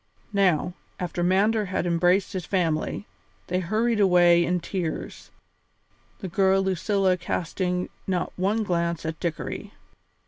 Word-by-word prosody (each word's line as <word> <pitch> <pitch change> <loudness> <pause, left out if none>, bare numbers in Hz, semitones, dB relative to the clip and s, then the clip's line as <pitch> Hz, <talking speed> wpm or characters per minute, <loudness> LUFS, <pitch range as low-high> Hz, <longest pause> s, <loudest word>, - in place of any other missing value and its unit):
Now, 180 -3 +2 0.3
after 180 -1 -3
Mander 205 +4 +3
had 185 -1 -2
embraced 175 +4 +2
his 185 -4 -4
family, 175 +1 -1 0.4
they 180 +1 -1
hurried 215 +5 0
away 175 -3 +5
in 180 +1 0
tears, 175 -2 -5 0.9
the 190 - -4
girl 190 +2 +3
Lucilla 190 0 +1
casting 180 +1 -2 0.2
not 185 -2 -1
one 205 +5 0
glance 170 -4 -1
at 160 -1 -4
Dickory. 170 -3 -4
180 Hz, 125 wpm, -25 LUFS, 175-195 Hz, 0.9 s, away